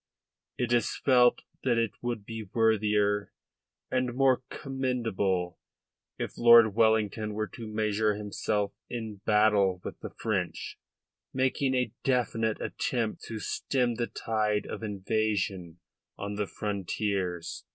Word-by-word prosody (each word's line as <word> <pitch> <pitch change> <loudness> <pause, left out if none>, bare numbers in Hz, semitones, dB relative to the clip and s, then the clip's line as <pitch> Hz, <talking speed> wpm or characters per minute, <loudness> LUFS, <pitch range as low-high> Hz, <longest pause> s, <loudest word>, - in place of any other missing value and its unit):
It 120 -1 0
is 120 -3 +1
felt 125 -2 +4 0.2
that 120 -3 +2
it 115 -3 +1
would 120 -4 -3
be 110 -3 -7
worthier 105 -2 +2 0.6
and 125 -1 0
more 130 -1 +4
commendable 115 - -1 0.6
if - - -5
Lord 115 -2 +8
Wellington 110 -1 +2
were 110 0 0
to 115 -2 -8
measure 110 0 +1
himself 105 0 -2 0.2
in 110 -3 -5
battle 105 -3 +4
with - - -7
the - - -6
French, 95 -6 -3 0.6
making 130 +1 +1
a 125 -3 0
definite 115 -4 +1
attempt 115 -4 -2
to 110 - -5
stem 125 +3 0
the 120 0 -2
tide 105 -2 -1
of - - -6
invasion 100 -4 -1 0.4
on 100 +1 -4
the 105 0 -2
frontiers." 95 -3 -3
110 Hz, 120 wpm, -29 LUFS, 105-120 Hz, 0.6 s, Lord